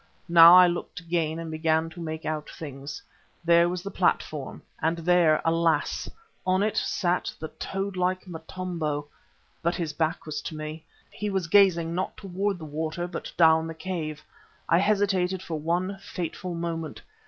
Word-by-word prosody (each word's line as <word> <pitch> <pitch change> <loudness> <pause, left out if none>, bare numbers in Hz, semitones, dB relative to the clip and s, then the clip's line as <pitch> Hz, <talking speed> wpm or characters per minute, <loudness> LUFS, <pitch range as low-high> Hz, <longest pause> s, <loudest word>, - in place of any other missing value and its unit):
Now 170 0 +9
I 180 0 +9
looked 175 0 -3
again 165 -2 -1
and 165 -1 -5
began 160 0 +1
to 170 +2 -9
make 160 -1 -5
out 155 -1 -3
things. 140 -1 -8 0.4
There 170 0 +5
was 180 0 -4
the 200 - -5
platform 155 -6 -1 0.2
and 165 +2 +1
there, 170 -2 +4
alas! 165 0 +1 0.3
on 185 +1 +2
it 215 - 0
sat 180 -2 0
the 160 - -5
toad 195 0 -4
like 185 0 0
Motombo. 160 -3 -4 0.6
But 170 +1 0
his 165 -4 -3
back 160 +1 -1
was 150 -1 -4
to 160 - -6
me; 155 +1 -6 0.3
he 210 - -4
was 190 -3 -1
gazing 170 -2 +4
not 185 +2 -3
towards 195 0 -2
the 160 - -8
water, 155 +3 -3
but 180 - -6
down 160 -1 +5
the 165 - -6
cave. 155 -3 -4 0.4
I 170 - +4
hesitated 195 -2 +1
for 160 -3 -4
one 180 +5 -1
fateful 180 -1 -5
moment. 165 -2 -4
170 Hz, 165 wpm, -26 LUFS, 160-180 Hz, 0.6 s, Now